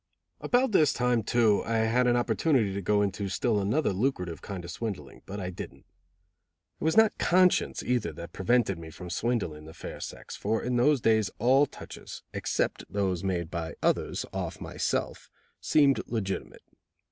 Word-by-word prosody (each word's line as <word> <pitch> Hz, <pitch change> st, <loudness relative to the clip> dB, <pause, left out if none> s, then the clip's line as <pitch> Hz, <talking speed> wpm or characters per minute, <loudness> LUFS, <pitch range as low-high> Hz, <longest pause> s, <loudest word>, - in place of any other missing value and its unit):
About 250 Hz, 0 st, +2 dB
this 155 Hz, -7 st, +4 dB
time, 125 Hz, -2 st, +1 dB
too, 110 Hz, -1 st, +3 dB
I 115 Hz, -, -2 dB
had 115 Hz, +3 st, +2 dB
an 120 Hz, -, +4 dB
opportunity 120 Hz, -2 st, +2 dB
to 100 Hz, -, -3 dB
go 105 Hz, +2 st, +2 dB
into 100 Hz, 0 st, -2 dB
still 105 Hz, +3 st, +1 dB
another 105 Hz, +5 st, +1 dB
lucrative 90 Hz, -6 st, -1 dB
kind 95 Hz, -4 st, -6 dB
of 85 Hz, -, -6 dB
swindling, 95 Hz, -, -6 dB
but 100 Hz, -, -6 dB, 0.2 s
didn't. -, -, -9 dB, 0.9 s
It -, -, -6 dB
was 160 Hz, +6 st, +1 dB
not 220 Hz, -1 st, +6 dB
conscience 180 Hz, 0 st, +3 dB
either 125 Hz, -3 st, 0 dB
that 85 Hz, 0 st, -9 dB
prevented 100 Hz, -3 st, +1 dB
me 80 Hz, -1 st, -9 dB
from 90 Hz, +2 st, -9 dB
swindling 90 Hz, -8 st, -2 dB
the 80 Hz, -, -12 dB
fair -, -, -8 dB
sex, -, -, -7 dB
for 110 Hz, +2 st, -1 dB
in 125 Hz, 0 st, -1 dB
those 135 Hz, +2 st, +3 dB
days 110 Hz, -3 st, +3 dB
all 135 Hz, +5 st, +4 dB
touches, -, -, -10 dB
except -, -, -1 dB
those 95 Hz, -3 st, -1 dB
made 90 Hz, -3 st, -2 dB
by 85 Hz, -1 st, -4 dB
others -, -, 0 dB
off -, -, -4 dB
myself -, -, -3 dB, 0.3 s
seemed 140 Hz, -3 st, +4 dB
legitimate. 100 Hz, -5 st, -4 dB
110 Hz, 165 wpm, -28 LUFS, 95-125 Hz, 0.9 s, not